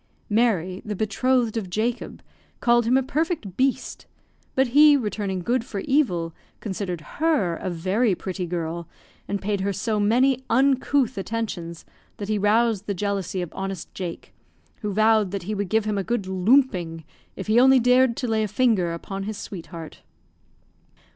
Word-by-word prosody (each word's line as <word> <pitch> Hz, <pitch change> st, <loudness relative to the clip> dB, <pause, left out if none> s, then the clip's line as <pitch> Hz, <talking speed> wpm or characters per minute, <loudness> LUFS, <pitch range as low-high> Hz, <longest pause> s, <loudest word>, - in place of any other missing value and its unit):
Mary, 195 Hz, -5 st, +1 dB
the 210 Hz, -1 st, -4 dB
betrothed 230 Hz, +3 st, +1 dB
of 200 Hz, -5 st, -3 dB
Jacob, 225 Hz, +6 st, -3 dB, 0.4 s
called 240 Hz, -1 st, +3 dB
him 250 Hz, +3 st, +4 dB
a 265 Hz, -, +2 dB
perfect 295 Hz, -, -2 dB
"beast"; 265 Hz, +2 st, -1 dB, 0.5 s
but 265 Hz, -1 st, +3 dB
he, 295 Hz, +3 st, +7 dB
returning 205 Hz, -6 st, -3 dB
good 240 Hz, +4 st, +1 dB
for 200 Hz, -4 st, -5 dB
evil, 180 Hz, -, +1 dB, 0.3 s
considered 190 Hz, -4 st, -4 dB, 0.2 s
her 295 Hz, -, +2 dB
a 190 Hz, -, -4 dB
very 190 Hz, +5 st, +1 dB
pretty 185 Hz, -1 st, -4 dB
girl, 170 Hz, -1 st, -4 dB, 0.4 s
and 200 Hz, -1 st, -3 dB
paid 200 Hz, -1 st, -1 dB
her 200 Hz, +1 st, 0 dB
so 210 Hz, +2 st, -1 dB
many 250 Hz, +5 st, +3 dB
uncouth 260 Hz, -1 st, +2 dB
attentions 190 Hz, -6 st, -4 dB, 0.3 s
that 205 Hz, 0 st, -6 dB
he 215 Hz, -1 st, +1 dB
roused 215 Hz, 0 st, +2 dB
the 200 Hz, -, -1 dB
jealousy 195 Hz, -1 st, -2 dB
of 175 Hz, -, -8 dB
honest 195 Hz, -2 st, -5 dB
Jake, 175 Hz, -3 st, -6 dB, 0.5 s
who 210 Hz, -2 st, -2 dB
vowed 215 Hz, 0 st, +3 dB
that 195 Hz, -1 st, -4 dB
he 210 Hz, +4 st, -3 dB
would 205 Hz, -2 st, -3 dB
give 220 Hz, +1 st, +2 dB
him 210 Hz, -2 st, -1 dB
a -, -, -1 dB
good 235 Hz, 0 st, -1 dB
"loomping" 185 Hz, -4 st, +2 dB, 0.3 s
if 190 Hz, -, -6 dB
he 220 Hz, +3 st, +4 dB
only 265 Hz, +1 st, +6 dB
dared 250 Hz, 0 st, +4 dB
to 250 Hz, -, -2 dB
lay 220 Hz, -1 st, +1 dB
a 215 Hz, -, 0 dB
finger 205 Hz, -7 st, +1 dB
upon 195 Hz, +3 st, -5 dB
his 215 Hz, 0 st, -4 dB
sweetheart. 165 Hz, -4 st, -8 dB
210 Hz, 165 wpm, -24 LUFS, 185-240 Hz, 0.5 s, he